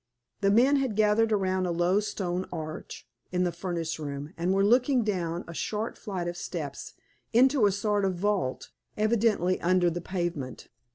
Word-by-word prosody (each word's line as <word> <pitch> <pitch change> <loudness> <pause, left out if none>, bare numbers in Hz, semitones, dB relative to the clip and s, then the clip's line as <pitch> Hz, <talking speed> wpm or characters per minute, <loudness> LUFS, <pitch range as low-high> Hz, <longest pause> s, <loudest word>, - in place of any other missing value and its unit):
The 195 - +2
men 250 +7 +5
had 265 -6 -1
gathered 215 +1 +3
around 190 -3 +1
a - - -1
low 175 +3 +2
stone 185 -3 -3
arch 155 -6 -7 0.2
in 180 0 +1
the 175 - +1
furnace 170 -2 -3
room, 145 +1 -5
and 170 +2 0
were 195 +1 +3
looking 250 +3 +4
down 175 -4 -2
a 170 - -7
short 215 +6 -3
flight 190 -6 -4
of 175 - -3
steps, 155 -6 -6 0.4
into 255 -1 +5
a - - +2
sort 205 +1 0
of 190 -1 +1
vault, 190 -7 -1 0.3
evidently 215 -4 +2
under 175 0 +3
the 175 +1 -4
pavement. 170 -8 -4
185 Hz, 170 wpm, -28 LUFS, 175-210 Hz, 0.4 s, men